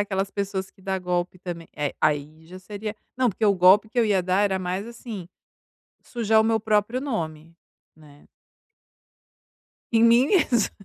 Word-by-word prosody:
aquelas 195 -1 -1
pessoas 195 -1 -3
que 190 - -24
dá 190 -1 -2
golpe 180 0 -2
também 175 -2 -7
eh, 145 -1 -2
aí 150 +1 -1
já 185 +2 -11
seria 210 +3 -6 0.2
não, 255 -1 +2
porque 215 +3 -3
o 200 -2 +4
golpe 190 +4 +5
que 240 +3 -4
eu 235 - +4
ia 200 -3 +2
dar 185 +3 +1
era 195 -2 +1
mais, 185 +3 -3
assim, 225 -6 -8 0.7
sujar 220 -2 +1
o - - +2
meu 225 -1 +1
próprio 215 +3 +1
nome, 165 - -5 0.4
né. 145 -2 -18 1.7
Em 225 - +4
mim 235 +3 +5
mesma. 255 - +2
195 Hz, 165 wpm, -24 LUFS, 180-220 Hz, 1.7 s, golpe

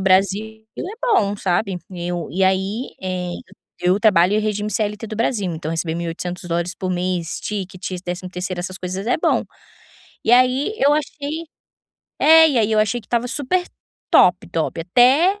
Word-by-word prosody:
Brasil 200 +4 +1
é - - -2 0.2
bom, 205 - +2
sabe, 185 0 -1
eu 175 -2 -4
e 190 +4 -1
aí, 190 +6 -1
eh, 180 -1 -3 0.5
eu 180 +3 +3
trabalho 195 -3 +4
em - - +3
regime 210 0 -2
CLT 210 +1 -2
do 215 0 -6
Brasil, 205 -6 0
então 160 0 -5
receber 165 0 -2
$1.800 175 +1 -3
por 185 -1 -4
mês, 180 -2 -2
tickets, 185 -3 -5
décimo 180 +1 -5
terceiro, 180 0 -4
essas 185 +1 -5
coisas, 185 +3 -5
é 245 - +2
bom. - - +2 0.8
E 225 - +3
aí 255 - +4
eu 285 +2 +4
achei 300 +2 -3 0.7
é, 320 0 +8
e 260 - +1
aí 220 0 +2
eu 215 - +3
achei 215 +3 +1
que 215 - -23
estava 240 0 0
super 355 +8 -1 0.5
top, 180 -1 +5
top, 165 0 -2
até 265 - +4
195 Hz, 165 wpm, -20 LUFS, 180-235 Hz, 0.8 s, é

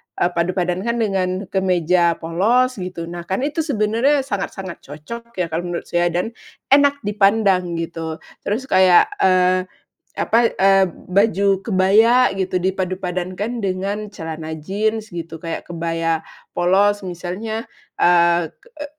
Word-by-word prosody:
eee, 175 - +1
padupadankan 180 +5 -1
dengan 195 -5 0 0.2
kemeja 180 -2 +2
polos 220 +9 +1
gitu, 180 -2 -5
nah 170 0 -7
kan 190 +8 -1
itu 300 +3 -2
sebenarnya 265 0 +1
sangat-sangat 195 -6 -5
cocok 230 +12 -10
ya 180 -3 -2
kalau 170 +2 -2
menurut 175 -1 -4
saya 175 0 +2
dan 175 +6 -2 0.4
enak 285 0 +4
dipandang 195 -3 +2
gitu. 165 -1 -4 0.2
Terus 220 +6 -2
kayak, 185 -7 +5
eee, 185 0 +3 0.5
apa, 230 0 +3
eee, 195 0 +4
b 180 +3 -11
baju 200 -1 +3 0.2
kebaya 220 +5 +4
gitu 185 -1 -1
dipadupadankan 185 +4 -3
dengan 200 +2 -3
celana 160 -3 -6
jeans 215 +3 -2
gitu, 165 -1 -6
kayak 165 +1 -5
kebaya 165 -1 -1 0.3
polos 195 +3 +2
misalnya, 185 +6 -5 0.3
eee, 170 -2 +3
k - - -37 0.2
e - - -5
185 Hz, 130 wpm, -20 LUFS, 175-215 Hz, 0.5 s, kayak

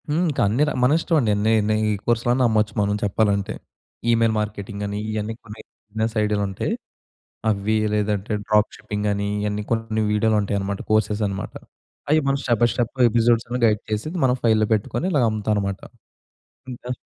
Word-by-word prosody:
హ్మ్. 155 +4 +1
ఇంక 145 - -3
అన్ని‌ర 135 +9 +2
మనిష్టమండి 145 - +2
నే 110 - +4 0.2
నే 110 - +3 0.3
కోర్సులన్నా 120 +2 +2
అమ్మొచ్చు 110 -1 +1
మనం 105 0 +1
చెప్పాలంటే. 100 -1 0 0.6
ఈమెయిల్ 115 -1 +3
మార్కెటింగ్ 105 -1 -4
అని. 100 +1 -3
ఇవన్నీ 110 +1 -3
కొన్ని 105 0 -10 0.3
బిజినెస్ 110 +1 -2
ఐడియాలుంటాయి. 100 -2 -1 0.8
అవి 105 +1 0 0.2
లేదంటే, 105 -1 -1 0.2
డ్రాప్ 105 0 +3
షిప్పింగని, 105 -1 -2
ఇయన్నీ 105 0 -2
కొన్ని 115 -1 0
వీడియోలుంటాయన్నమాట. 100 -2 0
కోర్సెసనమాట. 105 -2 0 0.6
అయి 155 +1 +5
మనం 135 0 +2
స్టెప్ 120 -4 +1
బై - - +6
స్టెప్ 120 +1 -2
ఎపిసోడ్స్ 115 0 +2
అన్ని 125 +1 -2
గైడ్ 105 -2 +2
చేసి 105 +8 -2 0.2
మనం 125 -1 +3
ఫైల్‌లో 110 -2 +3
పెట్టుకొని 110 - -1
ఇలాగ 140 -7 +3
అమ్ముతామనమాట. 105 -2 -1 0.9
ఇంక 125 0 -5
110 Hz, 140 wpm, -22 LUFS, 105-115 Hz, 0.9 s, బై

